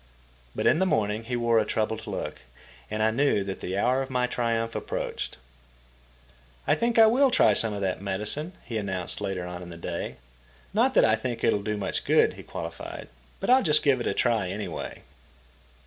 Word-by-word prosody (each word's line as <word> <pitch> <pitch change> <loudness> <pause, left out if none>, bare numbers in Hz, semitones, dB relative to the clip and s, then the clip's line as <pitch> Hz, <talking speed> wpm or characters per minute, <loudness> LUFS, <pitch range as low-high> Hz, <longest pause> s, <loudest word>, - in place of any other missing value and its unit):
But - - -2
in - - +4
the 190 - +2
morning 110 - 0
he 125 +1 -2
wore 120 -1 +3
a - - +3
troubled 110 +1 -2
look, - - -4 0.5
and 110 0 -1
I 110 - +3
knew 125 -4 +2
that 95 -1 -5
the 95 +1 -3
hour 125 +6 +2
of 135 - -4
my 125 -1 +1
triumph 115 -2 -1
approached. - - -4 1.3
"I - - +3
think 235 0 0
I 225 - +9
will 260 +5 +5
try 250 - +5
some 115 - +1
of 100 - -4
that 95 -1 -1
medicine," 105 - -3
he 115 -3 -3
announced 95 -2 -3
later 95 -3 -3
on 90 0 -6
in 90 - -9
the 85 - -9
day. 85 0 -4 0.6
"Not - - +2
that - - +6
I 110 0 +4
think 115 +1 -4
it'll 100 - +3
do 105 +1 -2
much 100 - -2
good," - - +4
he - - -10
qualified, 85 0 -7 0.3
"but 195 - 0
I'll 260 +1 +7
just 150 -6 +3
give 135 -4 +3
it - - -2
a - - +1
try 115 -6 +1
anyway." 95 -3 -5
110 Hz, 200 wpm, -27 LUFS, 100-130 Hz, 1.3 s, I